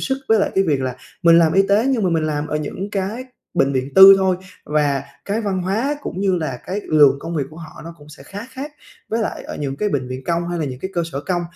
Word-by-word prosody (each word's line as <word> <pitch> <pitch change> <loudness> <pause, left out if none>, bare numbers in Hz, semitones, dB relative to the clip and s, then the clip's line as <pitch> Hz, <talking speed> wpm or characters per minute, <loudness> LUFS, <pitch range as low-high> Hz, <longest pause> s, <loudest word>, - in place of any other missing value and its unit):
sức 265 0 -1
với 225 - +5
lại - - +1
cái 195 - +3
việc 145 -6 +1
là 130 -1 -3 0.3
mình 170 -1 +7
làm 165 -2 +4
y 195 - +5
tế, 210 +5 +3
nhưng 260 -5 +1
mà 180 - +2
mình 160 -2 +1
làm 150 -1 -2
ở 150 - -1
những 185 +6 -5
cái 205 +6 -3 0.3
bệnh 135 - +2
viện 130 +1 -3
tư 195 +1 +11
thôi 190 -1 +1 0.3
và 145 -2 0 0.2
cái 205 +3 -1
văn 190 -3 -1
hóa 225 +11 -1
cũng 185 - -5
như 195 -2 +2
là 150 -7 -3
cái 195 +3 -3
lượng 150 -3 +5
công 165 0 -5
việc 145 - 0
của 155 - -14
họ 160 -2 -11
nó 165 0 -9
cũng 145 0 -16
sẽ 150 - -13
khá 205 +7 -8
khác 280 +3 -7 0.4
với 225 - -1
lại - - -4
ở - - -7
những 140 -2 -4
cái 210 - 0
bệnh 130 -6 -2
viện 130 +1 -6
công, 170 0 -1
hay 175 0 -3
là - - 0
những 130 -1 -7
cái 190 - -4
cơ 170 - +1
sở 140 - -3
công 175 +2 -2
170 Hz, 280 wpm, -20 LUFS, 145-195 Hz, 0.4 s, tư